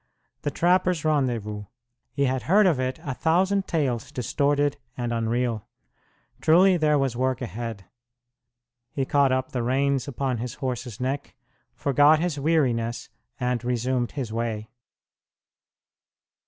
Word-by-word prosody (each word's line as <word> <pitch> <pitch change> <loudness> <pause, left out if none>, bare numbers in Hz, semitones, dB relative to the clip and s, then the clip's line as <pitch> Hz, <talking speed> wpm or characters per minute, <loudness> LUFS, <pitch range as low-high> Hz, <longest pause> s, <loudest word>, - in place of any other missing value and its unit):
The - - -1
trappers' 180 +1 +2
rendezvous! 120 -9 0 0.5
He 140 - 0
had 130 -1 0
heard 205 +3 +6
of 165 -8 +3
it 130 0 -2
a 135 - -3
thousand 190 +8 +1
tales 130 -8 -1
distorted 145 +3 0 0.2
and 120 -1 -2
unreal. 115 -1 -1 0.7
Truly 180 +4 +5
there 155 -3 +3
was 135 -4 0
work 130 +1 0
ahead. 115 -5 -5 1.1
He 135 - -1
caught 140 -1 +3
up 130 0 -1
the 125 - -2
reins 135 +2 +1
upon 130 -2 -2
his 120 +1 -5
horse's 125 -4 -4
neck, 135 +3 -3 0.4
forgot 145 +2 +4
his 160 -2 -1
weariness, 130 -7 0 0.3
and 125 -1 -1
resumed 125 0 -1
his 125 -7 -4
way. 110 -2 -3
130 Hz, 125 wpm, -25 LUFS, 120-145 Hz, 1.1 s, heard